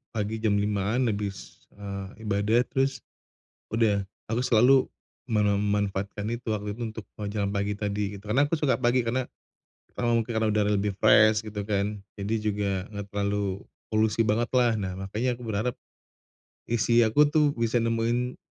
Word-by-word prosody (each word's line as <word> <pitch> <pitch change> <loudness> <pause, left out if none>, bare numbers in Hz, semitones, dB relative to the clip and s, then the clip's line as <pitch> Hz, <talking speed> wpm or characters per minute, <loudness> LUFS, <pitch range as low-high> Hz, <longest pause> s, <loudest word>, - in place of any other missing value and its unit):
pagi 110 +1 -2
jam 105 -2 +2
5.00-an 105 +4 0
habis, 100 -1 -6
eee, 100 +2 -7
ibadah 105 +3 +2
terus 135 0 -1 0.7
udah, 105 -3 +2 0.3
aku 115 +2 0
selalu 130 +3 +5 0.4
memanfaatkan 105 -1 0
itu 120 -1 -5
waktu 105 0 -3
itu 120 - -10
untuk 110 -1 -8
mau 105 - -4
jalan 100 -1 -1
pagi 100 +1 -1
tadi 105 -1 -2
gitu, 100 +2 -12
karena 135 +7 +4
aku 165 - +1
suka 145 -3 +2
pagi 120 +1 +2
karena, 125 +2 0 0.7
karena 120 - 0
mungkin 115 0 +1
karena 110 0 +2
udara 105 -1 +2
lebih 105 0 +1
fresh 110 0 +6
gitu 105 -2 -6
kan 105 0 -1 0.2
jadi 105 +3 -1
juga 105 -2 -1 0.2
enggak 100 -1 -6
terlalu 100 -1 -2 0.2
polusi 110 0 +1
banget 115 +2 +1
lah 120 -3 +3
nah 95 -3 -3
makanya 110 +6 -1
aku 120 - -8
berharap, 110 +3 -1 0.9
isi 120 +1 +3
aku 130 +7 +4
tuh 150 0 +3
bisa 115 0 0
nemuin 115 +2 0
105 Hz, 160 wpm, -27 LUFS, 100-115 Hz, 0.9 s, fresh